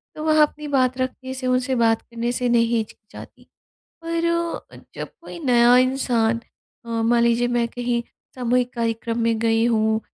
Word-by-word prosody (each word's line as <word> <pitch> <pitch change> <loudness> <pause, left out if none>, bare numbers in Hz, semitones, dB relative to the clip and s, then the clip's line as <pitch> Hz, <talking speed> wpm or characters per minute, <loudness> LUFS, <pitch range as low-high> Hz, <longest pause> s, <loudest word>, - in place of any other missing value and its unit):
तो 305 - -6
वह 310 -1 +4
अपनी 300 0 0
बात 260 -3 +1
रखने 260 0 -4
से, 260 -1 -4
उनसे 255 +1 +1
बात 225 -2 +2
करने 235 0 -4
से 250 0 -1
नहीं 235 -1 +4
हिचकिचाती। 215 -1 -7 0.6
पर 335 0 -1 0.7
जब - - -6
कोई - - -9
नया 245 -1 +5
इंसान 245 -3 +2 0.4
अ, - - -13
मान 230 +1 +2
लीजिए 235 +1 +2
मैं 235 -1 +2
कहीं 240 0 -2 0.3
सामूहिक 250 0 0
कार्यक्रम 230 0 -2
में 230 -1 +1
गई 225 0 +2
हूँ 220 -1 +1
240 Hz, 160 wpm, -22 LUFS, 230-255 Hz, 0.7 s, नया